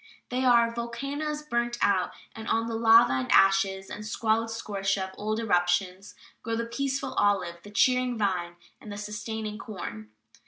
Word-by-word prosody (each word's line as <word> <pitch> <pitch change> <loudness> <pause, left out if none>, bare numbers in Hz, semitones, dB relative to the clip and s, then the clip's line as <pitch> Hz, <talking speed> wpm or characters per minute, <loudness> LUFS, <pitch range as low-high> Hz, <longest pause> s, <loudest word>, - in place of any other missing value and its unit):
They 255 +1 -1
are 235 -2 +4
"volcanoes 275 +6 -4
burnt 240 -4 -1
out, 190 -3 +2 0.2
and 220 0 -8
on 225 0 +1
the 230 - -4
lava 225 - +6
and 130 -1 -1
ashes 195 0 +4
and 210 - -7
squalid 220 +1 0
scoria 215 -3 -5 0.2
of 190 - -6
old 215 +1 -2
eruptions 180 -1 0 0.3
grow 230 +1 -2
the 230 +1 -2
peaceful 265 +3 -3
olive, 185 -4 +1
the 205 - -12
cheering 250 +3 +2
vine, 180 -4 -1 0.2
and 215 - -10
the 205 - -6
sustaining 210 +1 -5
corn." 110 - -7
220 Hz, 160 wpm, -27 LUFS, 195-235 Hz, 0.3 s, lava